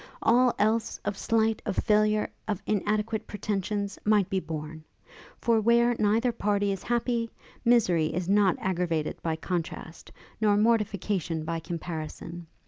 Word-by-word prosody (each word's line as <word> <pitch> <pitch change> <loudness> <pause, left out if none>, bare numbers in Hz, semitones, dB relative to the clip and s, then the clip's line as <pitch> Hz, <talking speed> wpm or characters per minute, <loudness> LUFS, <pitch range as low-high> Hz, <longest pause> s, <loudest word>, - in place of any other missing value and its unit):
All 245 +2 +5
else, 220 +2 +1
of 205 0 -1
slight, 225 +1 +1
of - - -3
failure, 215 0 +2 0.2
of 205 -4 -2
inadequate 215 +1 -1
pretensions, 205 -1 -3
might 210 -3 +3
be 190 - +1
borne; 155 -2 -6 0.5
for 230 -2 +2
where 235 +2 +4
neither 220 +4 +2
party 205 -2 0
is 195 - -3
happy, 235 -1 0 0.3
misery 185 -10 +3
is 170 +2 -3
not 200 -2 +3
aggravated 175 -4 -1
by 160 -1 -1
contrast, 165 -1 -5 0.3
nor 205 -1 +4
mortification 200 -7 0
by 165 +1 -2
comparison. 165 0 -6
205 Hz, 135 wpm, -27 LUFS, 175-220 Hz, 0.5 s, All